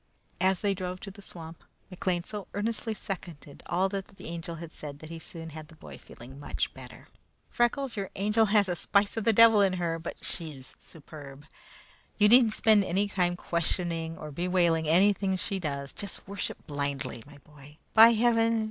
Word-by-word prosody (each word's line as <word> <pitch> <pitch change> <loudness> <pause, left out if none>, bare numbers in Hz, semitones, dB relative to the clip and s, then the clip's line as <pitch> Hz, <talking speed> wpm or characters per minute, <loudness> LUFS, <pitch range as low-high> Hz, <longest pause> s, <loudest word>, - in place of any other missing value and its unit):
As 190 -1 +2
they 205 -1 +2
drove 185 -1 -5
to 195 - -7
the 200 - -13
swamp, 165 -4 -10 0.3
McLean 180 -1 -1
so 205 0 -7
earnestly 220 +1 -2
seconded 170 -8 -7
all 185 +2 +1
that 195 -1 -4
the 195 - -13
Angel 170 0 -5
had 165 0 -9
said 145 -3 -8
that 155 +2 -11
he 165 - -6
soon 165 0 -9
had 155 0 -9
the 165 - -16
boy - - -12
feeling 130 +4 -12
much 145 - -2
better. - - -12 0.4
"Freckles, 245 +2 0
your 195 -2 -3
Angel 210 +3 +2
has 205 -1 +4
a 180 - -1
spice 200 +3 +1
of 225 - -3
the 225 - +6
devil 225 -1 +7
in 195 -2 +3
her, 170 -2 -2
but 165 - -6
she's 150 -6 -5
superb! 145 -2 -11 0.7
You 210 -1 +5
needn't 235 -2 +6
spend 215 -2 +4
any 195 +3 0
time 180 -3 +1
questioning 170 -1 0
or 150 - -8
bewailing 170 0 +1
anything 190 +3 +3
she 195 +1 -3
does. 140 -4 -4
Just 200 -2 -7
worship 200 -1 -5
blindly, 140 -4 -3
my 145 -1 -14
boy. 145 +1 -17 0.2
By 225 +1 +9
heaven! 230 0 +3
180 Hz, 185 wpm, -28 LUFS, 160-205 Hz, 0.7 s, By